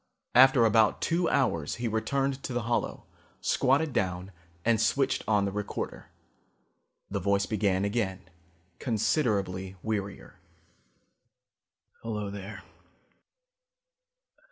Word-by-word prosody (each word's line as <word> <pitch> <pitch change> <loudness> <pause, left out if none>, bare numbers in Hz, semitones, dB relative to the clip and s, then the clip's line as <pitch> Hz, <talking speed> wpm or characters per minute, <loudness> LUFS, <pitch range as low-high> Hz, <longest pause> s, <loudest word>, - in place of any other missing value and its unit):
After 130 -1 +7
about 110 -1 +4
two 170 +1 +1
hours 85 - +1
he 120 0 -3
returned 135 +5 -1
to 130 - -5
the 120 -1 -1
hollow, 120 +2 -2 0.3
squatted 140 +3 +2
down 90 0 -1 0.3
and 115 -1 +3
switched 135 +4 +1
on 105 -2 +3
the 100 - -2
recorder. 105 +1 -5 1.0
The 100 - -1
voice 100 +1 +1
began 100 -3 0
again, 95 -4 -2 0.5
considerably 100 - 0
wearier. 100 -3 -4 1.6
"Hello 105 -3 -4
there. 100 +1 -8
110 Hz, 100 wpm, -28 LUFS, 100-125 Hz, 1.6 s, After